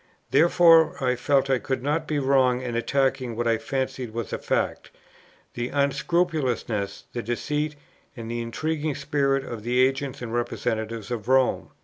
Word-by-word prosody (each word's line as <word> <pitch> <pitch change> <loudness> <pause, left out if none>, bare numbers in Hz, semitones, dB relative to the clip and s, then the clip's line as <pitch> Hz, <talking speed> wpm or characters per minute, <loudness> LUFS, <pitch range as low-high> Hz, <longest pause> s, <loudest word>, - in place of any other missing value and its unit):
Therefore 165 -1 +6
I 125 -1 +1
felt 135 +2 +2
I 135 -2 +2
could 130 -1 -3
not 155 +3 -1
be 150 - -1
wrong 130 -2 +3
in 125 -2 -4
attacking 130 0 0
what 120 +1 -1
I 115 -1 +2
fancied 130 -3 -3
was 115 -3 -4
a - - -2
fact, - - -1 0.6
the 120 0 -3
unscrupulousness, 140 - 0
the 120 - -2
deceit, 150 +6 -2 0.4
and 115 0 -6
the 120 0 -2
intriguing 155 +5 -2
spirit 140 -1 0
of 115 -2 -6
the 120 +3 0
agents 135 0 -2
and 115 -1 -5
representatives 115 -2 -2
of 115 -2 -4
Rome. 130 -1 +2
130 Hz, 155 wpm, -25 LUFS, 120-145 Hz, 0.6 s, Therefore